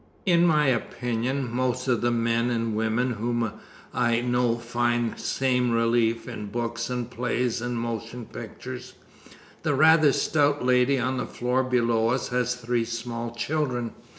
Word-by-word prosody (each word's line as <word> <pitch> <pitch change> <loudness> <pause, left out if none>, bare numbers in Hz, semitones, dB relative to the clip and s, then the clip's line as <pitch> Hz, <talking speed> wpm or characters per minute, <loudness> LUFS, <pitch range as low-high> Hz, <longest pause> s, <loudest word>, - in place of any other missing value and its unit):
In 175 -2 +4
my 150 -2 +4
opinion, 125 +1 -1
most 125 0 -1
of 120 -3 +2
the 120 - +2
men 115 0 +1
and 115 -2 -1
women 110 +3 +1
whom 115 0 -1 0.4
I 120 -1 +2
know 120 -1 +1
find 120 0 0
the - - -14
same 125 -2 +1
relief 115 0 +1
in 110 -4 -6
books 120 +2 -3
and 125 -2 -2
plays 125 -1 -1
and 120 -1 -2
motion 115 +1 -4
pictures. - - -8 0.7
The 145 - 0
rather 155 0 +6
stout 145 -1 +1
lady 125 +2 +4
on 130 +1 -1
the - - -2
floor 125 +2 0
below 120 -3 +2
us 125 +1 -1
has 125 0 0
three 120 -1 -1
small 115 0 -4
children. 125 -3 -1
120 Hz, 150 wpm, -26 LUFS, 115-125 Hz, 0.7 s, rather